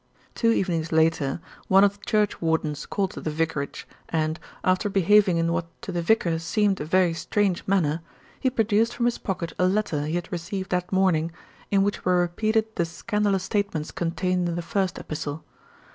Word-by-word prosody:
Two 230 - +2
evenings 170 -7 0
later, 160 -3 +2 0.3
one 195 +1 +6
of 200 0 +2
the - - -14
churchwardens 160 -8 0
called 195 -2 -2
at - - -11
the - - -1
vicarage 155 -2 -2 0.2
and, 160 0 -1 0.2
after 185 +2 +2
behaving 195 -1 +4
in 165 0 +1
what 170 -1 -1 0.2
to - - -4
the 175 -1 -1
vicar 170 -3 +2
seemed 195 +3 +1
a - - -3
very 180 +1 +3
strange 185 +3 0
manner, 170 -5 +1 0.4
he 260 - +2
produced 225 -1 +1
from 240 - 0
his 240 - 0
pocket 170 -4 -3
a 180 - +4
letter 185 -7 0
he 160 - -2
had 175 0 -3
received 185 +2 -4
that 180 -1 -1
morning, 180 -4 +2 0.4
in 195 -1 +3
which 205 +1 -1
were 180 -1 +3
repeated 215 +6 +1
the 170 - +2
scandalous 200 +2 -1
statements 195 -6 -2
contained 180 +1 -1
in 170 - -2
the 175 - -3
first 185 +1 -1
epistle. 155 0 -5
180 Hz, 180 wpm, -25 LUFS, 165-200 Hz, 0.4 s, one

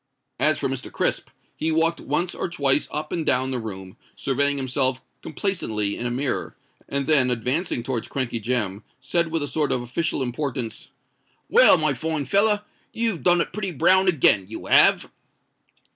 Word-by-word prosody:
As - - +4
for - - -1
Mr. - - -5
Crisp, - - -1 0.3
he 160 - -2
walked 165 +1 +1
once 175 +1 -1
or - - -3
twice 140 -5 +2
up 150 0 -4
and 165 - -2
down 130 -2 +1
the 130 - -2
room, 95 -4 -8 0.2
surveying 140 +1 0
himself 130 -1 0 0.2
complacently 110 - -2
in 120 - -3
a - - -2
mirror, 130 +1 -3 0.3
and 140 0 -2
then 140 -4 +4
advancing 125 +3 -1
towards 120 -2 -3
Crankey 130 -4 -3
Jem, 110 -3 -2 0.2
said 170 +6 0
with 160 -2 -1
a - - -3
sort 150 0 -1
of 125 - 0
official 135 +3 -2
importance, 125 -2 -4 0.6
"Well, - - +7
my 155 -2 +1
fine 155 +2 -2
feller, 210 +3 +2 0.3
you've 225 -6 -2
done 175 -1 +4
it - - -4
pretty 195 -4 -3
brown 185 +6 +4
again—you 110 - +2
have." - - +4
140 Hz, 165 wpm, -23 LUFS, 125-165 Hz, 0.6 s, Well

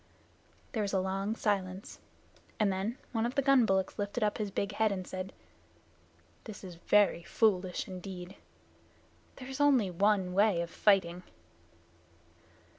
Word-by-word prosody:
There 220 - -1
was 200 -1 -2
a 190 - +3
long 195 +3 -2
silence, 195 -3 -2 0.6
and 205 -3 +3
then 200 +6 -3
one 225 -2 0
of 240 +2 -2
the 275 - +2
gun 270 -4 +5
bullocks 190 +1 0
lifted 205 +3 -2
up 210 +1 0
his 210 -2 -1
big 200 +1 -2
head 215 +1 +1
and 185 -2 -3
said, 185 +1 -5 1.1
"This 215 -2 -9
is 185 -2 -8
very 195 +1 +3
foolish 185 -1 +1
indeed. 185 0 -8 1.0
There 255 - -9
is 265 +1 -4
only 260 -10 +4
one 190 0 +2
way 200 -2 +3
of 170 0 -5
fighting." 180 -4 +2
200 Hz, 145 wpm, -31 LUFS, 185-215 Hz, 1.1 s, gun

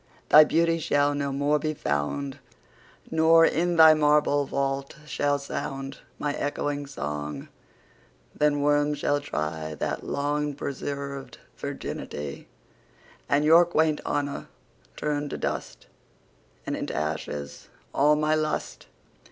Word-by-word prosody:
Thy 155 - +10
Beauty 165 +2 +2
shall 145 -2 +2
no 140 -1 -2
more 145 +2 +1
be 155 +1 -2
found; 135 - -2 0.7
Nor, 165 +1 +6
in 175 +2 +1
thy 160 -1 +9
marble 150 -2 +3
Vault, 135 0 -2
shall 145 -1 0
soundMy 135 -1 -5 0.3
ecchoing 145 0 -3
Song: 75 - -5 0.8
then 150 -1 +1
Worms 145 0 +2
shall 145 0 0
tryThat 80 - -3
long 145 0 -2
preserv'd 140 -1 -5 0.2
Virginity:And 75 - -6
your 165 +3 +8
quaint 160 -3 +1
Honour 145 -1 -2 0.5
turn 145 -1 -2
to - - -4
dust; - - -4 0.8
And - - -2
into - - -4
ashes 75 -1 -4 0.2
all 150 +2 +4
my 150 +1 +1
Lust. 155 -1 -2
145 Hz, 110 wpm, -26 LUFS, 135-150 Hz, 0.8 s, Thy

